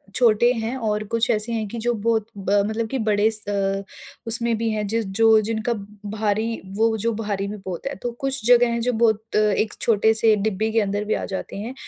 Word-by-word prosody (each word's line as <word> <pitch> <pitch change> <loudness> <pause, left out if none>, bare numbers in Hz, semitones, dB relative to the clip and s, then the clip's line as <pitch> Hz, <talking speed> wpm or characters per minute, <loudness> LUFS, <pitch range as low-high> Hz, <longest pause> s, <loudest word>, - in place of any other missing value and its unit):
छोटे 240 -1 +4
हैं 230 +1 -3
और 210 0 0
कुछ 230 +1 +1
ऐसे 215 +2 -1
हैं 220 -2 -2
कि 235 - -7
जो 240 - +2
बहुत 225 0 0
ब 195 -1 -3 0.2
मतलब 220 +1 -2
कि 270 - -2
बड़े 210 +1 +3
स 215 -1 -2
अ, 195 -1 -1 0.4
उसमें 235 0 +5
भी 225 +1 -1
हैं 215 -1 -2
ज 225 +3 0 0.2
जो 225 -1 +6
जिनका 220 +2 -2 0.4
भारी 220 +1 -1
वो 225 +1 +2
जो 230 +2 -1
भारी 205 -2 -3
भी 210 +1 -6
बहुत 180 -3 -6
हैं। 280 - -4
तो 240 - -3
कुछ 270 -3 -3
जगह 245 0 +6
हैं 235 - -1
जो 250 +2 0
बहुत 220 -1 0
अ, - - +5
एक 215 0 +1
छोटे-से 220 0 +3
डिब्बे 215 +1 -1
के 225 - +2
अंदर 205 0 -1
भी 215 - 0
आ - - -2
जाते 190 0 -6
हैं, 225 +5 -5
220 Hz, 220 wpm, -22 LUFS, 210-230 Hz, 0.4 s, जो